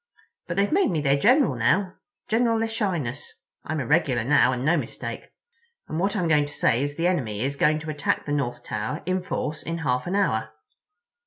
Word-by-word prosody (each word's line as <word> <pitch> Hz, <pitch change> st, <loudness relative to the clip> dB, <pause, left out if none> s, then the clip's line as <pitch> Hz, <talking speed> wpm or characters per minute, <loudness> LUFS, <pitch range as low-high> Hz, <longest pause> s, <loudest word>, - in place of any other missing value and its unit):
But -, -, -4 dB
they've 200 Hz, +1 st, +2 dB
made 385 Hz, +4 st, +3 dB
me 170 Hz, -5 st, 0 dB
their 140 Hz, -2 st, +3 dB
General 250 Hz, -, +4 dB
now—General 220 Hz, -, 0 dB
Echinus. 180 Hz, -, -2 dB, 0.4 s
I'm 155 Hz, +1 st, -3 dB
a 130 Hz, -, -2 dB
regular 140 Hz, -5 st, +2 dB
now, 130 Hz, -1 st, +4 dB
and 125 Hz, +1 st, -3 dB
no 165 Hz, +4 st, +4 dB
mistake, -, -, -5 dB, 0.6 s
and 155 Hz, -, -3 dB
what 195 Hz, +3 st, 0 dB
I 195 Hz, -, 0 dB
was 165 Hz, -, 0 dB
going 150 Hz, -2 st, +3 dB
to 145 Hz, -, -11 dB
say 120 Hz, -3 st, +2 dB
is 145 Hz, +1 st, -3 dB
the 170 Hz, -, 0 dB
enemy 120 Hz, -, 0 dB
is 140 Hz, +2 st, -1 dB
going 155 Hz, +2 st, +3 dB
to 155 Hz, -1 st, -4 dB
attack 145 Hz, -1 st, -1 dB
the 145 Hz, -, -4 dB
North 120 Hz, -4 st, -2 dB
Tower 110 Hz, +9 st, -4 dB
in 185 Hz, 0 st, 0 dB
force 155 Hz, -4 st, -3 dB
in 165 Hz, 0 st, -4 dB
half 125 Hz, -4 st, -1 dB
an 185 Hz, -, -1 dB
hour." 110 Hz, -, 0 dB
155 Hz, 200 wpm, -25 LUFS, 130-185 Hz, 0.6 s, General